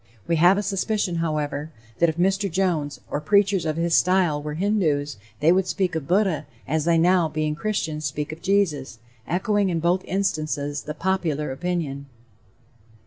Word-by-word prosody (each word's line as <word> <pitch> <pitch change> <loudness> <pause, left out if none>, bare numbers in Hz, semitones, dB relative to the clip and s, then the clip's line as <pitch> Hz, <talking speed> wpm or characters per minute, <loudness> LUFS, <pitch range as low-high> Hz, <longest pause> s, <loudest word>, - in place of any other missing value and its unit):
We 165 - +2
have 175 +5 +5
a 205 - -1
suspicion, 195 -2 -1
however, 155 -2 -2 0.3
that 170 - +4
if 160 - -4
Mr. 195 +3 +1
Jones, 165 -5 -1
or 145 - -1
preachers 200 0 +2
of 155 0 -1
his 170 0 0
style, 180 -5 +3
were 150 0 -5
Hindoos, 155 - 0 0.2
they 160 +3 +5
would 185 +1 +2
speak 185 -2 -1
of 160 -4 -3
Buddha, 180 -6 +1 0.2
as 155 +1 0
they 170 -1 +3
now, 175 0 +3
being 155 0 -1
Christians, 160 -4 -2
speak 150 0 -3
of 155 - -9
Jesus 160 -11 0 0.3
echoing 200 +3 +1
in 170 -2 0
both 175 +3 +1
instances 155 -6 -1
the 150 - -6
popular 160 -5 -1
opinion. 140 -2 -3
170 Hz, 165 wpm, -24 LUFS, 150-190 Hz, 0.3 s, have